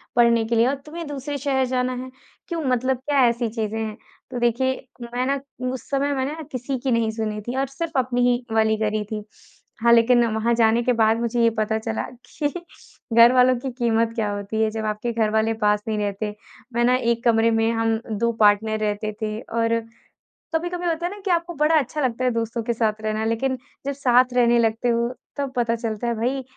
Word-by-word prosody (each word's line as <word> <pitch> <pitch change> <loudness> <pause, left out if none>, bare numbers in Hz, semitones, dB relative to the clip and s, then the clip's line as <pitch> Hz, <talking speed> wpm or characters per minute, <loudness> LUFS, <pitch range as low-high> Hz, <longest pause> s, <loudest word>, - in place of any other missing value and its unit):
पढ़ने 235 -1 +4
के 230 +1 -1
लिए 230 +2 +4
और 275 - +1
तुम्हें 330 +2 -7
दूसरे 285 0 -4
शहर 265 -1 +1
जाना 255 0 -1
है, 260 - -8 0.4
क्यों, 335 -2 -3
मतलब 255 +1 +1
क्या 280 -3 +4
ऐसी 235 -1 0
चीज़ें 220 -1 -3
हैं?" 220 -1 -4 0.3
तो 245 - -3
देखिए, 260 +3 0 0.3
मैं 250 +1 0
ना 275 +1 0 0.3
उस 260 - -8
समय 280 +1 +1
मैंने 265 +1 -1
ना 320 - -7
किसी 255 +1 -3
की 265 - 0
नहीं 230 -2 +2
सुनी 215 -1 -3
थी 245 - -3
और 270 0 +1
सिर्फ 320 +5 -5
अपनी 250 -1 +1
ही 245 0 0
वाली 220 0 +3
करी 215 0 0
थी। 215 -1 -3 0.6
हाँ, 235 +1 +4
लेकिन 235 +1 +5
वहाँ 225 +2 +1
जाने 230 0 +3
के 250 - +2
बाद 225 -1 +3
मुझे 235 0 0
ये 230 - +6
पता 215 0 +1
चला 220 0 -3 0.2
कि 295 - -2 0.7
घरवालों 250 +2 +7
की 265 +2 -4
कीमत 230 -2 +1
क्या 220 -3 0
होती 205 +2 -3
है, 220 - +3
जब 220 0 -4
आपके 215 +3 -2
घर 225 -2 +1
वाले 220 +1 +2
पास 210 0 +3
नहीं 215 -1 -1
रहते। 210 0 -3 0.4
मैं 240 +1 +1
ना 250 +1 +4
1 235 -2 0
कमरे 230 -2 +4
में 225 0 +2
हम 225 -1 +1 0.2
2 235 +1 +2
पार्टनर 215 +1 +4
रहते 215 0 -1
थे, 215 0 -2
और 230 -1 0 0.8
कभी-कभी 350 +2 -2
होता 335 0 -1
है 350 - -2
ना 410 - -10
कि 375 - +1
आपको 340 0 0
बड़ा 300 +2 +3
अच्छा 295 +2 -3
लगता 255 -2 -1
है 250 - +3
दोस्तों 230 0 -2
के 235 - -1
साथ 220 -2 -1
रहना, 215 0 -1
लेकिन 255 +4 0 0.3
जब 280 - 0
साथ 255 -2 +3
रहने 240 -1 +4
लगते 230 +1 +1
हो 235 0 +1 0.3
तब 280 -2 -2
पता 235 -1 +1
चलता 225 0 -3
है 235 - 0
भई, 255 +4 -1
235 Hz, 215 wpm, -23 LUFS, 220-260 Hz, 0.8 s, घरवालों